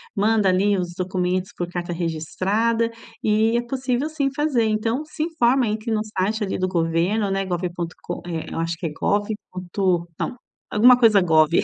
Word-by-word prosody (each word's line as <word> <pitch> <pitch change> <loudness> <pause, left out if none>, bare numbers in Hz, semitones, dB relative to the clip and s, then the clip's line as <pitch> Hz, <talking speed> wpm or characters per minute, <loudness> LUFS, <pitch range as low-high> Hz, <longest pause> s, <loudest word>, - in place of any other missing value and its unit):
Manda 210 0 +3
ali 195 +2 +3
os 175 -1 -3
documentos 185 0 -1
por 175 - -2
carta 175 0 -4
registrada 190 +8 0 0.3
e 220 +2 +3
é - - +1
possível, 260 +2 -1
sim, 295 -3 0
fazer. 285 -6 +1
Então, 225 +5 0
se 305 0 -4
informa, 265 -6 +2
entre 215 +2 -3
no 215 -1 +1 0.2
site 210 +4 0
ali 195 - -2
do 185 - +1
governo, 180 +4 +1
né, 195 0 0
gov 180 -1 -1
ponto 170 -1 -4
com, 175 - -5
eh, 165 -2 -3
eu - - -4
acho 165 0 -2
que 170 - -6
é 160 - -2
gov 205 +5 0 0.2
ponto, 180 -1 -1
não, - - -3 0.3
alguma 245 +4 +6
coisa 220 -4 +6
gov, 160 -4 +4
200 Hz, 185 wpm, -22 LUFS, 175-230 Hz, 0.3 s, alguma